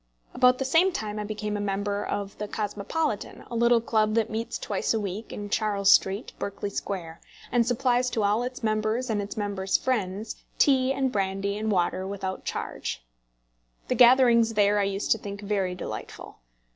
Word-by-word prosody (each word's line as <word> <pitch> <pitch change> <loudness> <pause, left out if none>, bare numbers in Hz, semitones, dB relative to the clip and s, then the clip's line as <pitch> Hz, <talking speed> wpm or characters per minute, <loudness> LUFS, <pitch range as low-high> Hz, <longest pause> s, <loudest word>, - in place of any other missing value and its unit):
About 250 0 +4
the 265 - -2
same 330 +8 +4
time 215 -8 -4
I - - -2
became 210 0 -4
a - - -2
member 200 0 -1
of 200 -1 -4
the 210 - -3
Cosmopolitan, 210 +5 -3
a - - -4
little 235 0 +4
club 215 -1 +1
that 225 -1 +1
meets 225 +1 -3
twice 205 +2 -1
a - - +1
week 205 +2 -5
in 205 - -5
Charles 205 -3 +2
Street, 195 +6 +3
Berkeley 200 0 -4
Square, 170 -5 -5 0.3
and 240 -2 +2
supplies 250 0 +2
to 225 -3 -1
all 205 +3 +2
its 250 0 -5
members, 220 +3 0
and 210 -2 0
its 205 +2 -7
members' 200 -2 0
friends, 210 -4 -2 0.2
tea 265 -3 +4
and 270 -1 0
brandy 195 -1 -1
and 215 +1 -2
water 185 0 0
without 190 -1 -5
charge! - - -4 0.8
The - - +2
gatherings 240 -2 +5
there 205 0 +4
I 200 - +2
used 195 +1 -2
to 225 - +4
think 200 0 -7
very 195 -3 -1
delightful. - - -8
210 Hz, 180 wpm, -26 LUFS, 200-235 Hz, 0.8 s, gatherings